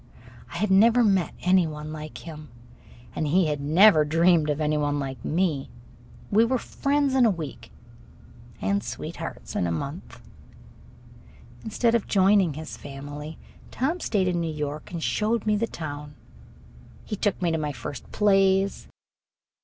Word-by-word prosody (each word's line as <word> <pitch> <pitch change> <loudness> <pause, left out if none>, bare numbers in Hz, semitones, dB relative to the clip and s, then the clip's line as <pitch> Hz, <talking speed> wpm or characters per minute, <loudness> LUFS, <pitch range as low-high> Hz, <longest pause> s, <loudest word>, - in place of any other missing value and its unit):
I - - -6
had 210 -2 0
never 230 +5 +5
met 195 -6 +1
any 180 -1 +4
one 150 0 -7
like 155 0 -8
him, 155 -2 -9 0.7
and 155 - -1
he 175 +4 +3
had 150 -2 -2
never 160 +3 +6
dreamed 165 +1 +3
of 150 0 -1
any 155 0 +1
one 145 -1 0
like 135 -2 -5
me. 160 -5 0 0.6
We 215 +3 +5
were 255 +3 +1
friends 280 +2 0
in 265 -1 +4
a 230 - +6
week 155 - -5 0.9
and 100 +1 0
sweethearts - - -7
in 90 - 0
a - - -1
month. 140 - -6 1.4
Instead 230 +1 +1
of 235 -3 +1
joining 190 -5 +3
his 155 +1 -7
family, 145 +2 -8 0.3
Tom 310 +8 -1
stayed 200 - 0
in 175 -1 0
New 165 -1 -2
York 150 0 -5
and 170 -2 -4
showed 220 +1 0
me 210 -1 +2
the 230 +2 0
town. 145 -4 -7 0.9
He - - -4
took 205 -1 -1
me 175 -2 0
to 160 - 0
my 150 -1 -2
first 140 -1 -8
plays. 195 -1 +2
165 Hz, 155 wpm, -25 LUFS, 150-205 Hz, 1.4 s, never